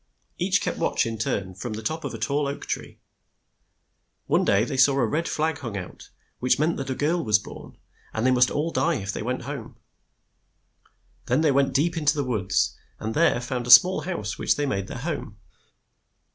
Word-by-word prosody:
Each - - +2
kept - - -3
watch - - +1
in 115 -1 -4
turn 95 -3 -2
from 110 +5 -6
the 110 +1 -6
top 160 +7 -3
of - - -4
a - - -6
tall 145 0 0
oak 140 - -5
tree. - - -5 1.3
One - - +2
day 100 +2 +3
they 135 - -4
saw 135 +1 +5
a 120 - +3
red 155 +9 -1
flag 160 0 -1
hung 115 -8 -5
out, 90 -2 -9 0.3
which 125 - +2
meant 155 +3 +1
that 135 -1 -5
a 130 - -1
girl 165 +5 0
was 105 -2 +4
born, 105 - -11 0.3
and 110 +2 -2
they 130 - +4
must 125 -1 +4
all 155 +3 -1
die 170 0 +1
if 100 -5 -3
they - - -4
went 125 +3 -3
home. 130 -2 -7 1.5
Then 130 +5 +2
they 155 -2 +3
went 135 -1 +2
deep 165 +5 +2
in 155 - -3
the 145 0 +2
woods, 100 -8 0 0.2
and 110 +1 -3
there 155 -4 +3
found 125 0 -4
a - - -5
small 180 +10 +8
house 135 - -4
which - - +2
they 145 - -1
made 100 -7 -2
their - - -7
home. 135 -7 -5
130 Hz, 205 wpm, -25 LUFS, 110-150 Hz, 1.5 s, small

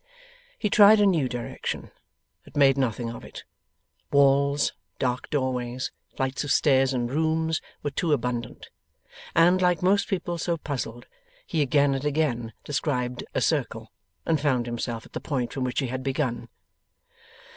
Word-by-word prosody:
He 210 - 0
tried 210 +1 +8
a 205 - +5
new 165 -9 +2
direction, 120 -1 -5 0.5
but - - -12
made 135 -2 +6
nothing 120 -3 -1
of - - -9
it; - - -10 0.7
walls, 140 0 +3 0.2
dark 125 -1 -2
doorways, 130 -2 -2 0.2
flights 130 +1 -1
of 145 - -3
stairs 135 -3 +4
and 120 -2 -1
rooms, 160 +2 0 0.2
were 145 - -1
too 160 +3 -1
abundant. 125 -3 -2 0.6
And, 175 +3 +5
like 180 -1 +2
most 200 +2 +3
people 175 -4 -2
so 170 0 -1
puzzled, 125 -6 -5 0.4
he 160 - -1
again 140 0 +3
and 135 0 -3
again 140 -7 -1
described 125 -4 -2
a - - +1
circle, - - -1 0.3
and 160 -3 +1
found 130 -5 +1
himself 120 -1 -4
at - - -18
the - - -4
point 130 -5 -2
from 130 -2 -2
which 125 +3 -1
he 135 - -1
had 130 +1 -3
begun. 130 -3 -2
135 Hz, 155 wpm, -26 LUFS, 125-160 Hz, 0.7 s, tried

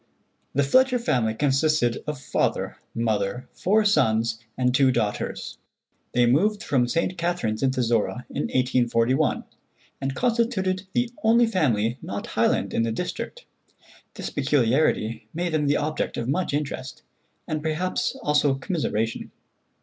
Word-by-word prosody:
The 140 - +3
Fletcher 255 - +4
family 120 - 0
consisted 135 -2 +1
of 150 -3 -3
father, - - -1 0.2
mother, 110 +1 -1
four 210 +3 +2
sons, 115 - +2 0.2
and 125 -1 +2
two 130 0 +4
daughters. 110 -4 -2 0.5
They 120 0 +4
moved 200 - +2
from 130 - +1
St. 170 +7 0
Catharines 170 -11 -1
into 130 -2 +1
Zorra 115 +1 0
in 145 - -2
1841, 125 -1 +1 0.6
and 135 0 -2
constituted 225 -6 0
the 240 -1 0
only 235 +2 +5
family 125 - +1
not - - -5
Highland - - +1
in - - +1
the 115 0 0
district. 180 - -5 0.7
This - - -5
peculiarity 125 -5 +1
made 175 +1 -1
them 150 -2 +1
the 145 - +3
object 155 +1 -2
of 115 - -3
much 175 +7 0
interest, 140 -3 -4 0.4
and 155 -1 -2
perhaps 165 - -1
also 150 -2 +3
commiseration. 130 - -2
140 Hz, 135 wpm, -25 LUFS, 120-180 Hz, 0.7 s, only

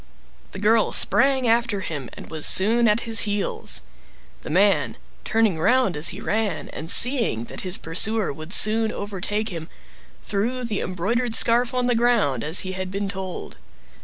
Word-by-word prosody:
The 195 - -8
girl 215 +2 +2
sprang 270 -2 +3
after 230 -3 +1
him, 145 -8 -6
and - - -12
was 155 -2 -1
soon 230 +5 +3
at 210 +2 +2
his 225 -1 +3
heels. 205 -2 -1 0.6
The - - -9
man, 195 +5 +1 0.3
turning 220 -6 0
round 245 0 +2
as 150 +3 +3
he - - -2
ran, 220 -1 -2
and 160 +2 -8
seeing 230 - +3
that - - -7
his 185 0 0
pursuer 195 +4 0
would 155 +4 -10
soon 220 +2 +2
overtake 205 +2 -4
him, 165 -3 -7 0.5
threw 235 +5 -2
the 220 -4 -3
embroidered 225 +7 -2
scarf 235 +2 +3
on 250 -1 0
the 245 - +1
ground, 230 - +1
as 160 +4 +2
he 185 - -4
had 185 0 -4
been 200 +1 -4
told. 190 -2 -7
205 Hz, 165 wpm, -22 LUFS, 185-230 Hz, 0.6 s, sprang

